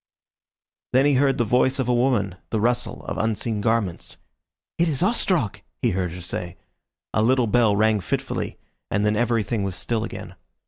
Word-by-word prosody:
Then 130 +2 +5
he 145 - +4
heard 135 +1 +3
the 120 - +2
voice 125 +4 +2
of 130 -3 -1
a 125 - +2
woman, 120 -6 +2 0.2
the 110 - 0
rustle 120 +3 0
of - - -4
unseen 110 0 -1
garments. 110 -5 -1 0.6
"It 170 - +4
is 145 +1 0
Ostrog!" 185 - +1 0.2
he - - +3
heard 90 -2 -1
her 90 - -7
say. 90 0 -5 0.6
A 110 - +2
little 125 +2 +3
bell 115 -2 +3
rang 110 0 +3
fitfully, 90 - -3 0.3
and 100 +1 +1
then 105 0 +2
everything 115 -1 0
was 95 -2 -2
still 115 +1 -2
again. 90 -5 -7
115 Hz, 175 wpm, -23 LUFS, 105-125 Hz, 0.6 s, Then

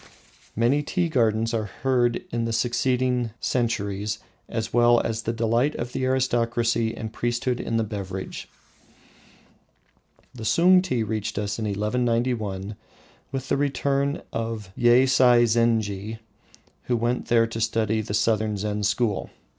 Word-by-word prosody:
Many 120 +6 +2
tea 175 +3 -1
gardens 115 -4 +1
are 110 -2 0 0.2
heard 125 -3 +2
of - - -5
in 115 0 -1
succeeding 125 +1 +1
centuries, 105 -4 -1 0.3
as 110 -1 -3
well 120 0 +5
as 115 0 -2
the 115 - -2
delight 115 +5 +1
of 120 +1 -5
the 130 - -1
aristocracy 120 -3 +1
and 110 0 -6
priesthood 120 +1 -1
in 115 - -2
the 115 - +1
beverage. 95 -3 -6 1.8
The 115 - -9
Sung 180 - +5
tea 130 -11 -1
reached 110 0 -3
us 105 +1 -2
in 110 - -2
1191 105 -1 -1 0.6
with 135 0 -4
the - - +2
return 140 0 0
of 115 -4 -4
Yeisai 125 0 +5
zenji, 110 -2 0 0.7
who 120 - +1
went 120 +2 -1
there 115 -1 +4
to 115 0 -5
study 110 -1 +1
the 105 -1 -3
southern 110 -1 +1
Zen 105 +1 -2
school. 105 +1 0
115 Hz, 135 wpm, -24 LUFS, 110-125 Hz, 1.8 s, well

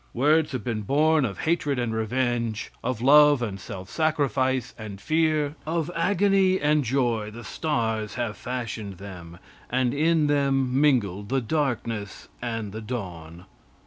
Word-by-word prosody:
Words 150 +4 +3
have 125 -5 -3
been 115 -3 -2
born 150 +6 +3
of 100 -5 -5
hatred 155 -4 0
and 120 -2 -1
revenge, 115 -1 -1
of 125 -3 -2
love 145 -1 +6
and 100 -4 -4
self 95 0 -8
sacrifice 135 -4 0
and 105 -3 -8
fear, 155 +2 +1
of 165 +1 -2
agony 190 +1 +3
and 150 0 +2
joy 120 -4 0
the 115 +3 -10
stars 110 - -2
have 115 -3 -2
fashioned 110 -6 -5
them, 90 -3 -10 0.3
and 125 -1 +1
in 155 +1 +2
them 135 -2 +1
mingled 105 -9 +1
the 135 +1 +2
darkness 115 - -2
and 115 -4 -3
the 110 +2 -6
dawn. 90 -7 -7
125 Hz, 145 wpm, -25 LUFS, 110-150 Hz, 0.3 s, love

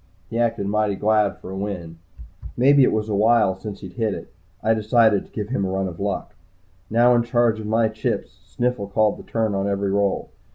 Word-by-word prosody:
He 115 - -2
acted 115 -4 0
mighty 105 0 0
glad 105 0 +1
for 95 - -10
a - - -5
win 90 -5 -5 0.6
maybe 140 +3 +5
it - - +4
was 110 0 -1
a 105 - -2
while 110 -1 +3
since 100 0 -8
he'd 95 -3 -9
hit 110 0 -1
it. - - -10 0.3
I 110 - +3
decided 110 -1 +3
to - - -28
give 105 -1 -5
him 125 -6 -1
a 95 - -1
run 95 0 -1
of 85 -2 -8
luck. 100 -1 -3 0.6
Now 120 +2 +4
in 120 - +4
charge 120 -2 +1
of 110 - -6
my 110 +1 +2
chips, 110 0 -4
Sniffles 120 -5 -2
called 110 0 +2
the - - -10
turn 110 -2 0
on 100 0 -1
every 100 -1 -1
roll. 100 -1 0
105 Hz, 215 wpm, -22 LUFS, 100-115 Hz, 0.6 s, maybe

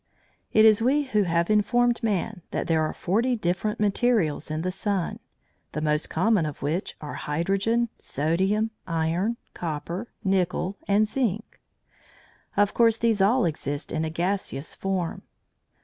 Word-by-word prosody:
It 215 0 +6
is 215 0 +6
we 275 +5 +3
who 220 -6 +1
have 170 +3 +1
informed 240 +3 +3
man 210 -2 -1
that - - -2
there 160 -2 +2
are 155 - 0
forty 230 +8 0
different 210 +2 -1
materials 205 -8 +1
in 155 +1 -2
the 185 - -1
sun, 195 -1 -2 0.5
the 150 - -2
most 150 0 0
common 200 +2 +2
of 145 -2 -7
which 160 +7 -2
are 150 - -6
hydrogen, 195 +10 0
sodium, 190 +9 0 0.2
iron, 170 +7 0 0.2
copper, 170 +6 -4 0.2
nickel, 190 0 0
and 205 +2 +3
zinc. 220 -3 -2 1.0
Of 205 0 +3
course 230 -1 +4
these 225 -3 +2
all 230 +6 +4
exist 145 -2 -3
in 160 0 -1
a 160 - -1
gaseous 170 -3 -2
form. 190 -3 -2
195 Hz, 145 wpm, -26 LUFS, 165-220 Hz, 1.0 s, It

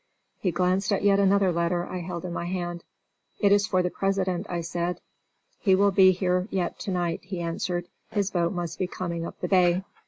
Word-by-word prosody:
He 190 - 0
glanced 185 +3 +1
at 200 - +1
another 200 -1 +4
letter 170 +1 0
I 185 - -5
held 175 0 -5
in 175 - -4
my 170 - -3
hand. 175 -1 -3 0.6
"It 200 -2 +4
is 205 +1 +4
for 185 -2 +2
the 180 - -1
President," 195 -1 -1
I 175 -1 -2
said. 175 +1 -2 0.6
"He 190 -3 +4
will 200 +1 +4
be 190 -1 +7
here 180 0 0
yet 185 -2 -2
to 200 - -4
night," 175 -2 -1
he 185 -1 -5
answered. 175 +1 -2 0.2
"His 200 -2 -1
boat 170 -1 +1
must 170 -3 -4
now 185 - +1
be - - -5
coming 170 -2 -4
up - - -11
the - - -1
bay." 180 -1 +3
180 Hz, 210 wpm, -26 LUFS, 175-195 Hz, 0.6 s, be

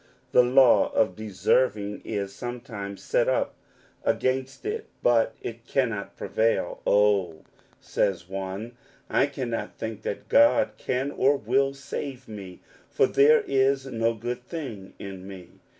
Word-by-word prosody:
The - - +7
law 125 0 +5
of 90 - +2
deserving 105 +1 0
is 100 -1 -3
sometimes 115 -5 -6
set - - +2
up - - 0 0.5
against 130 - -1
it, 430 +1 -3 0.2
but 115 -2 +3
it 115 0 -7
cannot 115 -7 -1
prevail. 115 +1 0
" - - -8
Oh," 100 -6 +2 0.4
says 90 -3 -1
one, 95 +4 -5 0.2
" - - -30
I 135 - +3
cannot 130 -5 -4
think 110 -1 -5
that 100 - -5
God 285 0 +5
can 130 +3 -1
or 140 0 +3
will 135 +4 +1
save 135 -1 -6
me, 100 -4 -9 0.3
for - - +3
there 145 +3 +5
is 135 0 +2
no 115 -3 0
good 120 +2 -5
thing 125 - -7
in 95 -1 -8
me 95 -3 -11
115 Hz, 140 wpm, -26 LUFS, 100-135 Hz, 0.5 s, The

